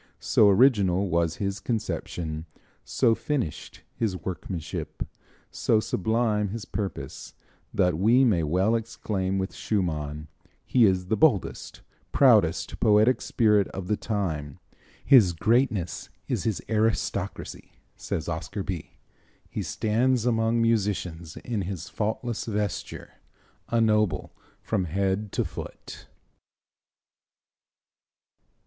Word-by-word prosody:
So 105 - +4
original 100 -4 +4
was 85 -1 +1
his 100 0 -3
conception, 85 -8 -3 0.4
so 115 - +2
finished 125 - -4
his 105 -5 -1
workmanship, 90 -3 -5 0.5
so 110 - +2
sublime 110 0 0
his 105 +1 -6
purpose, 100 -3 -5 0.4
that 90 -3 +1
we 120 +7 +5
may 105 -10 +3
well 90 +8 +1
exclaim 105 -4 -2
with 95 0 -2
Schumann, 75 -7 -2 0.4
"He 125 -3 +4
is 95 -1 +1
the 110 - 0
boldest, 125 - +1 0.3
proudest - - +3
poetic 110 +4 +4
spirit 105 -4 +3
of 95 -1 -7
the 105 - +1
time." 80 -11 -3 0.5
"His 115 -11 +6
greatness 110 -1 0 0.2
is - - -2
his 110 -5 -1
aristocracy," 110 0 -2 0.2
says 80 - -4
Oscar 85 +4 -4
Bie. 90 -5 -5 0.6
"He - - -3
stands 120 +2 +1
among 115 -1 +2
musicians 95 -8 -1
in 115 -4 -3
his 95 -2 -5
faultless 110 +2 -2
vesture, 105 -4 -4 0.6
a 115 - +2
noble 105 -8 +1 0.3
from 100 -5 0
head 95 +4 -1
to - - 0
foot." - - -9
100 Hz, 110 wpm, -26 LUFS, 90-115 Hz, 0.6 s, His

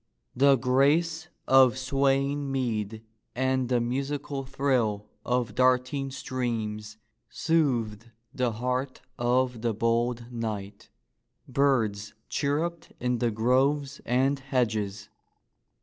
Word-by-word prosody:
The 140 +1 +6
grace 145 +6 +2 0.2
of 130 -1 +6
swaying 140 +1 +1
mead 110 -4 -2 0.3
and 130 0 0
the 125 -1 +3
musical 135 +3 -3
thrill 130 -7 0 0.2
of 125 -1 0
darting 130 +2 +2
streams 115 -5 -4 0.3
soothed 120 -9 0 0.2
the 125 -3 0
heart 125 +3 -2 0.2
of 125 0 +1
the 115 -2 0
bold 115 +2 0
knight. 110 -4 -5 0.6
Birds 115 -7 +1
chirruped 160 +4 -2
in 125 -1 0
the 120 - +2
groves 130 +5 +1
and 135 +3 +1
hedges. 110 -6 -1
125 Hz, 100 wpm, -27 LUFS, 115-135 Hz, 0.6 s, The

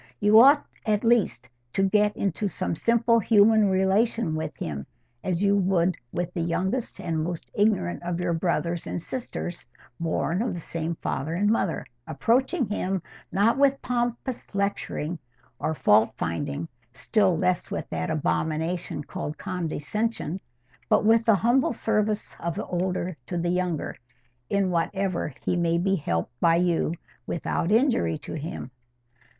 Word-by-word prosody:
You 210 +2 +7
ought 280 +4 +7 0.2
at 210 -2 +1
least 225 - +2 0.3
to 195 - +2
get 210 +1 +2
into 200 +2 -1
some 180 - -2
simple 230 +3 +3
human 215 -1 +5
relation 190 0 +2
with 155 -3 -4
him, 70 - -5 0.4
as 185 0 -1
you 200 0 +4
would 185 -2 +2 0.2
with 175 0 -3
the 170 - -2
youngest 190 +8 -1
and 160 -2 -1
most 170 0 -5
ignorant 200 -4 +1
of 175 0 -3
your 175 -1 0
brothers 170 0 -1
and - - -3
sisters 175 -4 -5 0.4
born 170 +2 0
of 235 -5 -1
the - - -5
same 165 0 -3
father 155 +2 -3
and 205 +4 +2
mother; 195 -7 0 0.2
approaching 245 - +1
him, 195 -3 -2 0.3
not 220 +6 +3
with 275 -1 +4
pompous 240 -1 -2
lecturing 190 -4 -2 0.4
or 160 - -1
fault 110 -4 +4
finding, 140 - -3 0.2
still 185 - +2
less 180 +2 0
with - - -4
that 180 - -2
abomination 160 +1 -1
called 150 +1 -5
condescension, 180 +2 -2 0.5
but - - +4
with 225 +1 +5
the 225 - +6
humble 240 +6 +2
service 215 -2 -1
of 170 -1 -3
the - - -3
elder 180 0 -2
to 175 - -3
the 170 0 0
younger, 180 -3 -1 0.5
in 195 -2 +1
whatever 175 0 -1
he - - +1
may 170 -1 +2
be 195 +3 +2
helped 85 - -2
by 165 -1 +4
you 170 -1 +1 0.3
without 170 +1 -1
injury 235 - +3
to 145 - -8
him. 155 -4 -5
180 Hz, 150 wpm, -26 LUFS, 165-215 Hz, 0.5 s, You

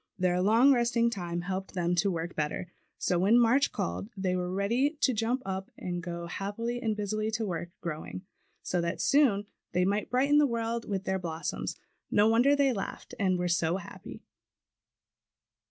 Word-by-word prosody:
Their 180 -1 +1
long 230 +8 +6
resting 235 -1 +2
time 175 -5 -3
helped 190 +2 -4
them 175 -1 +1
to 200 +3 +3
work 170 -1 -3
better. 155 +4 -3 0.3
So 180 - +1
when 205 +6 +5
March 245 +4 +4
called 90 +4 -3
they 185 -1 0
were 180 0 -2
ready 235 - +1
to 260 - +4
jump 235 +4 0
up 190 0 -4
and 175 -1 -4
go 170 -1 -5
happily 205 +7 -3
and 220 -2 0
busily 215 +1 -2
to 220 0 -1
work 170 -3 -3
growing, 170 +2 -5 0.4
so 180 - 0
that 170 +2 -2
soon 245 -9 +3 0.3
they 180 0 +2
might 205 +2 0
brighten 280 +4 +4
the 295 - +5
world 230 -1 -2
with 195 -2 -1
their 190 0 -1
blossoms. 165 -2 -4 0.3
No 210 +1 +4
wonder 240 +6 +5
they 280 -2 +3
laughed 195 - -6
and 185 -2 +2
were 180 0 -1
so 170 0 +1
happy. 185 - -10
195 Hz, 175 wpm, -29 LUFS, 180-235 Hz, 0.4 s, long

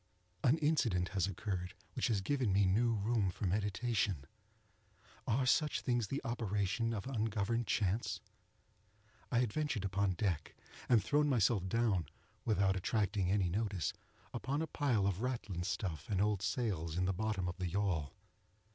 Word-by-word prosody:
An 130 +5 +5
incident 125 - +2
has 95 -1 0
occurred 95 -2 -3 0.2
which - - 0
has 110 -5 +1
given 130 0 +1
me 100 +1 +4
new 115 +5 +3
room 105 -1 +1
for 90 - -4
meditation. 100 - 0 1.0
Are 125 +2 +2
such 150 +4 +2
things 120 -4 0
the 140 - -3
operation 115 -1 0
of 105 -4 -3
ungoverned 115 -2 -1
chance? 105 +3 0 1.1
I 120 - +3
had 115 -4 -1
ventured 145 -10 -1
upon 100 0 +1
deck 85 -4 -2 0.3
and 115 -4 +5
thrown 150 0 +2
myself 110 -6 +2
down, 105 -6 +1 0.4
without 100 -3 +3
attracting 100 0 0
any 95 -1 +2
notice, 95 -4 -1 0.4
among 135 +5 -1
a - - 0
pile 135 -9 +1
of 100 0 0
ratlin 115 -8 -2
stuff 90 -5 -3
and 100 -3 +1
old 105 -1 +2
sails 95 -9 -1
in 90 - +2
the 95 - +1
bottom 100 -1 -1
of 90 - -4
the 90 -1 -2
yawl. 85 -6 0
105 Hz, 155 wpm, -35 LUFS, 95-120 Hz, 1.1 s, An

